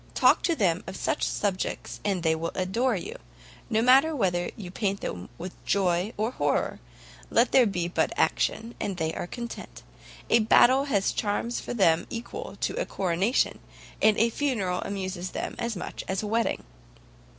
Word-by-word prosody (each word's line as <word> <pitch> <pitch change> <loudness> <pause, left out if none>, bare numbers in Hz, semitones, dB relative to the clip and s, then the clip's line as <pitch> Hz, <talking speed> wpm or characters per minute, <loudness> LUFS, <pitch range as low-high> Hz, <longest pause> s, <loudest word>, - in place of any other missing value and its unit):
Talk - - +5
to 335 - +2
them 180 - +1
of 190 0 -6
such - - -1
subjects, 195 -3 -2
and 190 -4 -1
they 160 - +3 0.2
adore 225 +7 +1
you; 440 - -5 0.5
no 220 -1 +2
matter 270 +6 +5
whether 175 -7 0
you 180 -4 -7
paint 200 -1 -1
to 90 +1 -5
them 180 +2 -5
joy 185 +1 +1
or 220 +3 0
horror, - - 0 0.5
let 235 +2 +3
there 255 -3 +6
but - - -2
be 175 -2 -2 0.3
action, 230 +2 0
and 195 -3 -3
they 160 -1 -1
are - - -4
content; 235 +4 -7 0.5
a - - +6
battle 255 +5 +5
has 200 -8 +1
charms 220 +3 -1
for - - -5
them 170 -6 +3
equal 235 0 -6
to - - 0
a - - -1
coronation, 190 +6 +1 0.4
and 215 -1 +5
a 230 +1 +3
funeral 220 -11 -1
amuses 185 -2 -4
them - - -4
as 235 -1 -2
much 180 - -6
as 190 +2 -1
a - - -3
wedding." 230 +2 0
205 Hz, 170 wpm, -27 LUFS, 185-235 Hz, 0.5 s, there